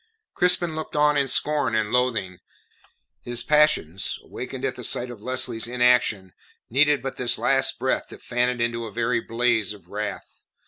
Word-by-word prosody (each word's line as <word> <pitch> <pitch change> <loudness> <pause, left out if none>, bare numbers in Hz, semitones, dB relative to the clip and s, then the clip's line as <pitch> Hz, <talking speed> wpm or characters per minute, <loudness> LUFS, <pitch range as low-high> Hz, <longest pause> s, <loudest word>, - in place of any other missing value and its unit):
Crispin 180 -2 +2
looked 155 -1 -6
on 150 0 +3
in 140 -1 +1
scorn 145 -4 +2
and 110 -1 0
loathing. 115 -8 0 0.8
His 120 0 -3
passions 150 - +2
awakened - - -6
at - - -1
the - - -8
sight 125 0 -1
of 115 -4 -11
Lesley's 130 -2 0
inaction 120 -6 +2 0.4
needed 145 +1 +3
but 135 - -5
this 125 -2 +1
last - - +2
breath - - -1
to - - -12
fan 125 +1 -1
it 125 0 -4
into 115 0 -1
a 110 - -8
very 115 +4 0
blaze 115 -3 0
of 95 -4 -17
wrath. 105 +2 -4
120 Hz, 170 wpm, -24 LUFS, 110-135 Hz, 0.8 s, on